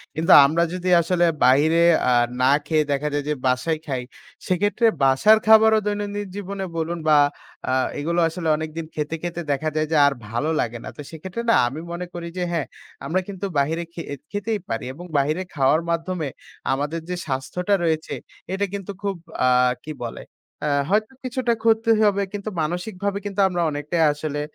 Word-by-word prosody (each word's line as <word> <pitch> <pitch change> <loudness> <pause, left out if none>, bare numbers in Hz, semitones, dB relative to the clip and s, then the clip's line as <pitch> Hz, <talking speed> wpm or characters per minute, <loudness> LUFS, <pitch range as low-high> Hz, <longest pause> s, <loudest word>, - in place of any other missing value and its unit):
কিন্তু 165 +4 +1
আমরা 160 +4 +2
যদি 180 0 -2
আসলে 175 +1 +2 0.2
বাইরে 150 +6 +4 0.3
আ - - +4 0.3
না 130 +1 +5
খেয়ে 155 0 +2
দেখা 140 +1 0
যায় 145 0 -1
যে - - +2
বাসায় 130 +6 0
খাই 130 -4 -2 0.5
সেক্ষেত্রে 205 +5 +1 0.2
বাসার 135 +12 +5
খাবারও 220 0 +7
দৈনন্দিন 205 0 -3
জীবনে 200 -1 -4
বলুন 165 +1 -2
বা 150 - +6 0.5
আ - - +1 0.3
এগুলো 170 +4 0
আসলে 165 0 -5
অনেকদিন 160 +1 -5
খেতে, 150 +1 -2
খেতে 175 0 -3
দেখা 155 +3 0
যায় 155 0 0
যে 160 - +3
আর 140 - +3 0.2
ভালো 120 +8 -1
লাগে 120 +1 -1
না। - - -6
তো - - -6
সেক্ষেত্রে 185 +7 -6
না - - +6
আমি 135 +5 -5
মনে 175 +1 -4
করি 170 -1 -6
যে 180 - -1
হ্যাঁ, 165 -4 -1 0.4
আমরা 180 +3 0
কিন্তু 200 -1 -5
বাইরে 160 +4 0
খে 170 - -6 0.3
খেতেই 205 +1 -2
পারি 115 0 -3
এবং 175 +6 -10
বাহিরে 155 +6 +1
খাওয়ার 140 +3 +3
মাধ্যমে 170 -1 -2 0.5
আমাদের 145 +5 -2
যে 180 - -1
স্বাস্থ্যটা 155 +8 -2
রয়েছে 160 -1 -1 0.4
এটা 195 +1 0
কিন্তু 200 -1 -5
খুব 200 -1 -1 0.3
আ 130 - +5 0.4
কি 155 - -5
বলে 115 - -7 0.7
হয়তো 215 +5 +1
কিছুটা 255 -1 0
ক্ষতি 225 0 +3
হবে 200 -1 +3
কিন্তু 205 +1 -4
মানসিকভাবে 185 +5 -2
কিন্তু 200 -1 -4
আমরা 175 -2 -2
অনেকটাই 150 +3 -1
আসলে 145 0 -4
170 Hz, 175 wpm, -23 LUFS, 150-200 Hz, 0.7 s, খাবারও